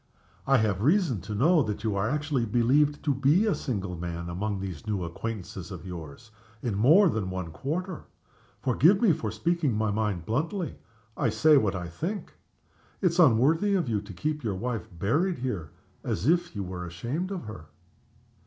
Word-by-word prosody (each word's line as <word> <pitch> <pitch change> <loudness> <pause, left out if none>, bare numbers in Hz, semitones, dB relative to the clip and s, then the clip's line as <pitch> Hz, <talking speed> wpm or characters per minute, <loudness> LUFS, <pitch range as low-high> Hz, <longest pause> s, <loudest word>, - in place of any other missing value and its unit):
I 135 0 +5
have 105 -5 +1
reason 150 - +2
to 105 +4 -5
know 155 - +4
that 105 -4 -3
you 110 -3 0
are 100 +2 0
actually 145 -4 0
believed 135 +7 +2
to 145 - +3
be 145 - +3
a 210 - +2
single 100 -8 -3
man, 85 0 -5
among 100 +3 -2
these 95 0 -6
new 100 -4 -1
acquaintances 95 0 -6
of 90 -2 -8
yours, 90 - -9 0.3
in 120 - -1
more 150 - +6
than 110 - -1
one 95 -3 -4
quarter. 165 - -4 0.6
Forgive 160 - +4
me 220 -5 +5
for 110 - -3
speaking 150 +6 0
my 110 0 0
mind 100 -5 -1
bluntly 160 - -2 0.4
I - - +1
say 155 -1 +5
what 105 -8 +3
I 90 -1 -4
think. 170 - -5 0.7
It's 180 -2 +1
unworthy 160 - +4
of 175 -7 0
you 110 -3 0
to 100 0 -11
keep 150 - -3
your 105 -4 -1
wife 115 +3 -3
buried 135 - 0
here, 105 -11 -3 0.3
as 95 +9 -2
if 175 -4 +2
you 100 - -2
were 90 -1 -6
ashamed 120 - -3
of 195 -3 -4
her." 105 -7 -9
115 Hz, 180 wpm, -27 LUFS, 95-155 Hz, 0.7 s, more